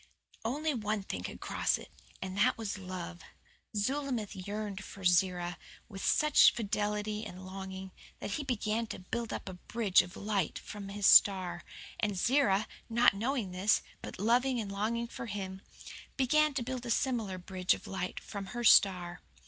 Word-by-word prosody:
Only 295 +7 0
one 210 -4 -2
thing 95 - -4
could - - -7
cross - - +1
it - - -12 0.3
and 190 0 -5
that 235 +6 +3
was 210 -3 -4
love. 180 -2 -6 0.6
Zulamith 250 -1 -1
yearned 200 0 -5
for 195 - -10
Zerah 180 -1 +2 0.3
with 195 -3 -7
such 300 -1 +6
fidelity 210 -1 -1
and 185 -3 -8
longing 190 0 -7 0.3
that - - -5
he 290 - -2
began 230 -3 -1
to - - -6
build 230 +5 -4
up - - -5
a 190 - -5
bridge 200 +2 +2
of 180 0 -10
light 200 -5 -1
from 200 -2 -8
his 200 0 -3
star; 185 -4 +6 0.4
and 205 -3 0
Zerah, 220 -2 +3 0.2
not 235 -2 +5
knowing 225 -1 -1
this, 185 +4 +2 0.2
but - - -7
loving 245 +5 +2
and 205 -3 -4
longing 220 +4 -1
for 235 +1 -7
him, 190 -2 -5 0.6
began 300 +2 +3
to 255 - 0
build 255 0 -4
a - - -4
similar 230 -6 0
bridge 185 0 0
of - - -12
light 185 -1 -4
from 200 -2 -7
her 240 +4 -5
star. 180 -5 +5
205 Hz, 165 wpm, -32 LUFS, 190-235 Hz, 0.6 s, such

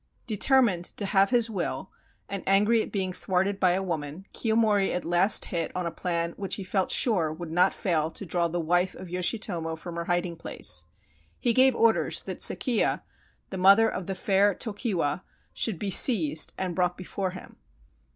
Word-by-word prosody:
Determined 220 -5 +2
to 205 - -2
have 195 0 +3
his 240 -2 +2
will, 190 -2 -4 0.4
and 195 -1 -5
angry 210 +4 +3
at - - -6
being 190 -2 -2
thwarted 190 +2 -1
by 180 -1 +3
a 190 +1 -1
woman, 160 0 -5
Kiyomori 220 -3 +1
at 180 - -4
last 175 +4 +3
hit 165 -2 -2
on 180 -1 -2
a 170 - -2
plan 170 0 -2
which 195 -2 -1
he 200 - -6
felt 190 0 -1
sure 180 -10 +2
would 160 +1 -8
not 180 +3 +3
fail 160 -4 -1
to 200 - -7
draw 170 0 0
the 175 +1 -3
wife 175 +3 0
of 185 - -10
Yoshitomo 180 -3 -2
from 170 +1 -9
her 170 - -3
hiding 175 -1 -1
place. 80 - -1 0.5
He 240 - 0
gave 260 +1 +4
orders 230 -1 +2
that - - -6
Sekiya, 245 -5 +1 0.5
the 190 - -5
mother 200 +4 +6
of 190 -5 -5
the 195 - -3
fair 200 +1 +2
Tokiwa, 200 - -2 0.3
should 220 -6 0
be 200 +3 -3
seized 160 - +4
and 185 -2 -3
brought 180 0 0
before 185 +1 -4
him. 185 0 -11
185 Hz, 180 wpm, -26 LUFS, 175-205 Hz, 0.5 s, mother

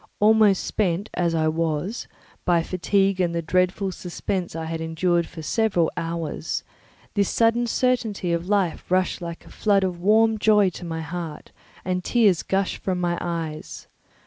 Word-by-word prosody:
Almost 210 -2 +5
spent, 195 0 -1
as 170 -2 0
I 160 -1 +2
was, 165 +6 -2 0.4
by 170 -2 +2
fatigue 195 +2 +1
and 170 -1 0
the 170 - 0
dreadful 185 +3 +1
suspense 180 0 -4
I 160 0 -4
endured 165 +1 0
for 160 -1 -9
several 185 -3 +1
hours, 165 -1 -3 0.5
this 200 -2 +1
sudden 230 +1 +2
certainty 225 -8 0
of 170 +2 -2
life 195 -5 0
rushed 185 0 +1
like 170 -1 -7
a - - -14
flood 200 -2 +2
of 180 -2 -2
warm 220 +3 +4
joy 210 -3 +4
to 175 - -9
my 165 -1 -4
heart, 160 -1 -6 0.3
and 180 0 -1
tears 210 -7 +3
gushed 195 0 -1
from 185 -2 -2
my 175 -1 0
eyes. 165 -3 -5
180 Hz, 155 wpm, -24 LUFS, 170-205 Hz, 0.5 s, Almost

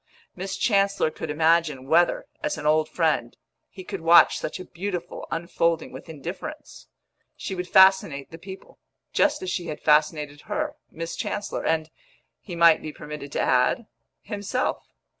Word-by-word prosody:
Miss 190 +1 -4
Chancellor 200 -6 +2
could 160 - -6
imagine 160 -3 +2
whether, 170 +5 +3 0.2
as - - -2
an 155 - -7
old 155 +1 +3
friend, 155 -8 0 0.3
he 190 - -10
could 195 -1 -6
watch 165 +1 +6
such - - -5
a 185 - -7
beautiful 180 -1 -5
unfolding 165 -1 -1
with - - -11
indifference. 185 - -8 0.5
She - - -5
would 180 -1 -4
fascinate 190 -8 +4
the 165 - -10
people, 190 +2 -11 0.3
just 300 -4 +2
as 185 - -3
she 175 - -3
had 150 - -5
fascinated 150 -1 +2
her - - -2
(Miss 165 +1 -6
Chancellor), 205 -1 -3
and, 160 -1 0 0.5
he 180 - -8
might 170 -1 +6
be 155 - -6
permitted 150 -2 -8
to - - 0
add, 125 - +2 0.4
himself. 205 +4 -2
165 Hz, 155 wpm, -25 LUFS, 155-190 Hz, 0.5 s, watch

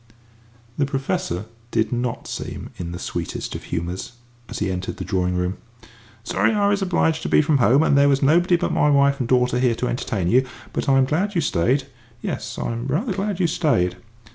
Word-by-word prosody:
The 140 - +2
Professor 135 - -2 0.2
did 110 -1 0
not 120 0 -2
seem - - -6
in 85 -1 -5
the 85 - -5
sweetest - - -4
of - - -7
humours 90 +6 -4 0.4
as - - -5
he - - -1
entered 90 0 -4
the - - -5
drawing 90 -2 0
room. 90 +1 -1 0.7
"Sorry 125 - +1
I 205 -1 +2
was 205 0 +1
obliged 175 -4 +1
to - - -3
be - - +5
from 150 -2 +2
home, 130 +5 +5
and 145 - +3
there 140 0 +5
was 140 0 +2
nobody 175 +5 +4
but 170 - -1
my 150 - +3
wife 140 0 +4
and 125 -2 -2
daughter 125 -1 +3
here 125 -2 +2
to 125 - -2
entertain 100 -7 -2
you. 125 +7 +4 0.3
But - - -1
I 135 - +5
am 135 - +4
glad 185 +9 -1
you 170 - +2
stayed 130 - +1 0.3
yes, - - -4
I'm 115 +2 -3
rather 190 - 0
glad 195 0 -2
you 180 - +3
stayed." 145 - +1
135 Hz, 205 wpm, -22 LUFS, 110-160 Hz, 0.7 s, be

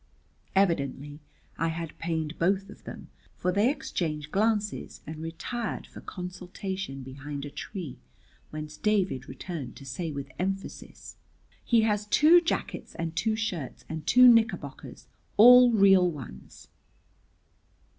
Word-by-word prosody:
Evidently 145 -6 0 0.4
I 165 - +1
had 165 -1 -4
pained 160 -1 -3
both 195 +3 +1
of - - -16
them, - - -9 0.3
for 180 - 0
they 205 +6 +3
exchanged 160 - -3
glances 210 0 -1
and 155 +1 -7
retired 165 +8 -4
for - - -12
consultation 180 -4 -6
behind 140 +2 -7
a 145 - -8
tree, 175 - -7 0.5
whence 150 0 -7
David 190 - 0
returned 135 0 -6
to 135 - -12
say 160 +5 -4
with 140 -2 -6
emphasis, 195 +2 -5 0.5
"He 235 -2 +4
has 210 -1 0
two 320 +9 +6
jackets 335 - -3
and 165 -1 -4
two 220 +4 +1
shirts 185 - -4
and 160 -1 -6
two 250 0 +8
knickerbockers, 230 -1 +1 0.3
all 245 +3 +9
real 195 -4 +5
ones." 130 - -10
180 Hz, 125 wpm, -28 LUFS, 150-210 Hz, 0.5 s, all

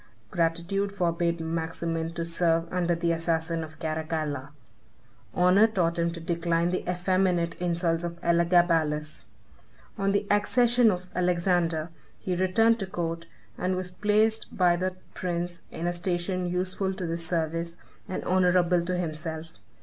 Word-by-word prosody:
Gratitude 170 +4 0
forbade 170 -3 0
Maximin 165 0 -2
to 170 0 -3
serve 165 0 +1
under 175 -1 +1
the 170 0 0
assassin 165 0 -1
of 160 0 -10
Caracalla. 155 -3 -3 0.8
Honor 180 - +5
taught 175 -5 0
him 170 0 +2
to 170 0 -6
decline 170 0 0
the 185 - -1
effeminate 180 -1 +1
insults 170 -1 0
of 170 0 -5
Elagabalus. 170 -3 +2 0.7
On 195 0 +2
the 200 +1 +1
accession 240 +3 +4
of 180 -2 -2
Alexander 175 -2 +1 0.3
he 185 - -2
returned 225 +6 +3
to 195 - -2
court, 170 -3 -4 0.3
and 185 +1 0
was 185 0 -3
placed 215 +3 +2
by 180 -2 +4
that 185 +1 -2 0.2
prince 175 -1 -3
in 165 - -5
a 175 - 0
station 180 +1 -1
useful 185 +2 -1
to 185 - -4
the 165 0 -2
service, 165 0 -2 0.3
and 185 - -3
honorable 180 -1 +3
to 180 +1 -2
himself. 160 -1 -4
175 Hz, 140 wpm, -27 LUFS, 165-185 Hz, 0.8 s, Honor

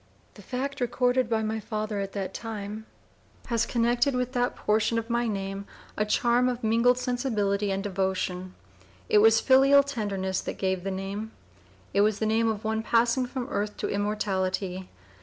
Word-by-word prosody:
The - - -13
fact, 265 +6 -4
recorded 245 0 +1
by 220 -1 +1
my 220 +1 -2
father 215 0 -3
at 195 0 -4
(p. - - -6
002) 190 - -2
the 190 - -19
time, 215 -1 -6 0.6
has 230 -2 0
connected 240 +3 +2
with 250 0 -1
that 245 -1 0
portion 215 +2 +1
of 230 +1 -3
my 235 0 +1
name 195 -1 -4 0.3
a 215 - 0
charm 245 +2 +3
of 245 -1 -4
mingled 235 +3 +3
sensibility 215 -6 0
and 195 0 -1
devotion. 185 -2 -2 0.5
It 210 - +5
was 225 +1 +6
filial 275 +1 +6
tenderness 200 -8 -2
that - - -5
gave 190 -2 -1
the 195 - -2
name. 195 +3 -5 0.6
It 200 - +4
was 210 0 +3
the 220 - -1
name 225 +1 +2
of 215 0 -3
one 220 0 -1
passing 235 +2 +2
from 255 0 -4
earth 210 -4 -2
to - - -2
immortality. 190 -2 -2
220 Hz, 175 wpm, -27 LUFS, 200-240 Hz, 0.6 s, was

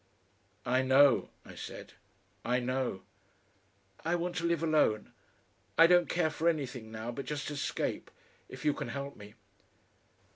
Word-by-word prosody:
"I 130 +2 +2
know," 135 0 +5 0.2
I - - -11
said, - - -9 0.5
"I 125 +1 +1
know." 130 -6 -2 1.0
"I 165 +2 +1
want 175 0 -2
to 170 - -1
live 170 -1 +1
alone.... 150 -10 +2 0.7
I 165 - +9
don't 175 0 +5
care 170 -2 +1
for 165 +2 +1
anything 130 -8 -3
now 110 +2 -5
but 135 +3 -6
just 150 0 -3
escape. 145 -1 -3 0.4
If - - -9
you 150 - +4
can - - -5
help 140 0 -5
me...." 105 +1 -13
140 Hz, 145 wpm, -31 LUFS, 125-165 Hz, 1.0 s, I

